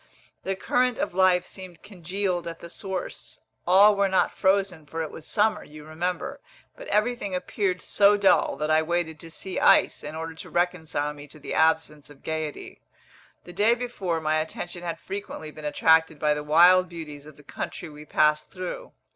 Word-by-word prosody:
The 195 - -2
current 250 +5 +1
of - - -2
life 185 -1 +3
seemed 185 -3 -11
congealed 185 -2 -3
at 165 0 -7
the 170 - -10
source: 190 -3 -6 0.3
all 200 +3 +7
were 200 -1 +2
not 190 - +1
frozen, 190 -5 +1
for 165 +2 -4
it 155 - -6
was 160 - -9
summer, 215 0 +1
you 150 0 -13
remember; 170 +3 -4 0.4
but - - -10
everything 210 -3 0
appeared 185 0 -2
so 205 0 +4
dull 200 -1 +3
that 150 +2 -2
I 155 0 +4
waited 160 -1 -2
to 165 - -10
see 185 +3 -5
ice, - - +4
in 150 +1 -6
order 165 0 -5
to 160 - -10
reconcile 160 -4 -1
me 145 0 -11
to 150 - -12
the 150 - -6
absence 160 -2 +1
of 145 -2 -17
gaiety. 155 -2 -5 0.6
The 175 - -12
day 210 +6 +3
before, 200 -9 -3
my 155 0 0
attention 175 +2 -5
had 170 -1 -4
frequently 190 -5 -7
been 155 0 -10
attracted 160 +1 +3
by 150 0 +2
the 150 0 -4
wild 175 +4 +5
beauties 150 -4 -9
of 155 - -14
the 145 - -16
country 170 - -6
we 150 -1 -11
passed 150 0 +2
through. 185 - -7
170 Hz, 185 wpm, -25 LUFS, 155-190 Hz, 0.6 s, all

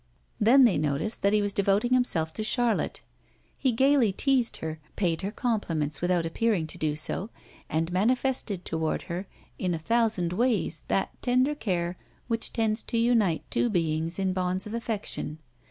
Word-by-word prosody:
Then 250 +6 +6
they 225 -11 +4
noticed 150 +9 -1
that 200 - +3
he 210 0 +3
was 205 -1 -1
devoting 200 +5 +2
himself 165 -11 +1
to 215 - -4
Charlotte; 235 0 0 0.5
he 265 - +1
gaily 265 -2 +3
teased 255 +3 +2
her, 160 0 -5 0.2
paid 175 -4 0
her 195 - -2
compliments 170 - -1
without 175 -1 +1
appearing 190 +1 0
to 155 - -5
do 150 -1 0
so, 185 +6 -2 0.4
and 165 +2 -1
manifested 220 -1 0
toward 160 -1 -1
her 180 +3 -5 0.3
in 180 -2 0
a - - -2
thousand 210 -1 +1
ways 240 +3 0
that - - 0
tender 255 +3 +2
care 180 -9 -2 0.3
which 230 -1 -1
tends 220 -1 0
to 230 - -2
unite 230 -8 +2
two 240 - +2
beings 165 -3 0
in 190 -1 0
bonds 185 0 -1
of 210 - -7
affection. 220 -9 -3
200 Hz, 165 wpm, -27 LUFS, 170-235 Hz, 0.5 s, Then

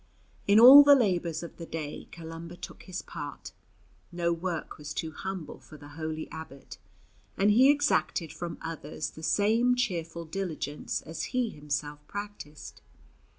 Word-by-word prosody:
In 205 +2 +6
all 265 +5 +12
the 285 0 +8
labours 180 - 0
of 170 - -9
the 170 - -7
day 155 -2 -6
Columba 165 +1 -9
took 175 0 -9
his 185 -1 -5
part; 145 -3 -8 0.6
no 170 -1 0
work 170 -2 -4
was 150 0 -7
too 160 - -3
humble 190 0 -6
for 155 - -14
the 145 0 -13
holy 155 +1 -5
abbot, 160 -4 -10 0.6
and 205 +1 +4
he 255 +6 +6
exacted 285 - +1
from 170 +1 -6
others 155 -2 -5
the 160 - -12
same 225 +8 +3
cheerful 170 -8 -2
diligence 160 -4 -4
as 160 +1 -5
he 240 -3 +1
himself 145 0 -4
practised. 200 -8 -8
170 Hz, 150 wpm, -29 LUFS, 155-200 Hz, 0.6 s, all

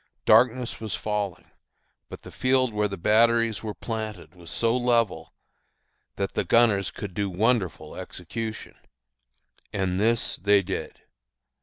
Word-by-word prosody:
Darkness 125 0 +4
was 110 -3 -3
falling; 105 -4 -3 0.6
but - - -10
the - - -11
field 130 -2 +1
where 105 0 +1
the 100 -1 -6
batteries 115 +2 +3
were 110 -2 -5
planted 110 -8 -6
was 85 -2 -12
so 115 +7 +1
level 115 -10 +1 0.8
that 100 - -3
the - - 0
gunners 110 -5 +3
could 100 -3 -7
do 100 +1 -1
wonderful 95 -5 0
execution. 110 +5 -6 1.0
And 95 -2 -1
this 115 +2 +1
they 100 +1 +3
did. 95 +1 -5
105 Hz, 130 wpm, -26 LUFS, 95-115 Hz, 1.0 s, Darkness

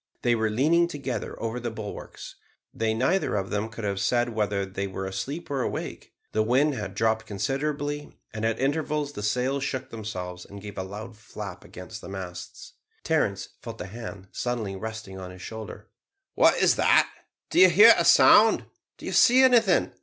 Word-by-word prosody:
They 120 - +3
were 110 -1 +1
leaning 155 +10 +3
together 140 -6 -5
over 115 +2 -3
the 120 0 -3
bulwarks. 110 -2 -8 0.4
They 110 0 0
neither 135 - +1
of 95 -1 -2
them 105 +2 -1
could 115 0 -8
have 100 -2 -1
said 120 +3 +1
whether 105 -3 -1
they 95 +1 -4
were 95 0 -5
asleep 135 - -5
or 135 -2 0
awake. - - -5 0.2
The 110 - +1
wind 130 +7 +2
had 105 -6 -5
dropped 110 +1 0
considerably, 145 +6 -3 0.2
and 110 0 -5
at 115 0 0
intervals 150 +1 -1
the 105 - -6
sails 125 +6 0
shook 130 -1 -4
themselves 90 -5 -6
and 100 - -11
gave 100 0 -9
a - - -2
loud 105 +4 -8
flap 100 -5 -8
against - - -10
the - - -9
masts. 95 - -8 0.3
Terence 105 -12 0
felt 115 -2 -8
a - - -5
hand 100 -2 -9
suddenly 115 -5 -3
resting 110 -2 -7
on 90 -1 -7
his 90 0 -11
shoulder. 110 -1 -8 0.5
"What - - +5
is - - +3
that? - - +5 0.4
Do - - +3
you 185 0 +9
hear 210 +7 +9
a - - +1
sound? - - +6 0.3
Did - - -11
you - - -3
see 255 +2 +6
anything?" 230 -8 +4
110 Hz, 185 wpm, -26 LUFS, 100-140 Hz, 0.5 s, you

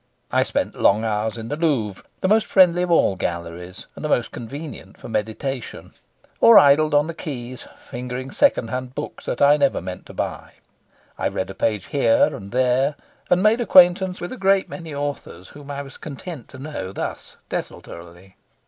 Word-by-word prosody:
I - - +3
spent - - -1
long 105 +3 +3
hours 110 +1 -1
in 115 0 -7
the - - -2
Louvre, 135 - -1 0.2
the - - +1
most 215 +2 +3
friendly 180 -2 +5
of 180 - -1
all 165 - +3
galleries 85 +1 -5
and - - -9
the 150 - -2
most 120 -5 +1
convenient 135 -4 -8
for - - -10
meditation; 110 +3 -4 0.5
or 230 - +8
idled 145 +2 +5
on 145 0 +4
the 165 - -5
quays, 130 -6 -7
fingering 125 +2 -6
second 125 - +2
hand 125 0 -5
books 150 - -6
that - - -1
I 145 +1 +6
never 140 -2 +2
meant 90 0 -8
to - - -11
buy. - - -5 0.7
I - - +1
read 95 +1 -3
a - - -8
page 105 -3 -1
here 285 - +2
and 100 0 -10
there, 130 +3 +2 0.3
and 180 +1 +3
made 220 +3 +4
acquaintance 185 -3 +5
with 175 - -6
a - - -8
great 195 -1 +2
many 165 -3 -8
authors 140 -11 -5
whom 145 -1 -13
I 140 0 -4
was 135 - -12
content 150 - -8
to 130 - -13
know 130 -10 -6
thus - - -6
desultorily. 85 +3 -8
135 Hz, 185 wpm, -22 LUFS, 110-165 Hz, 0.7 s, or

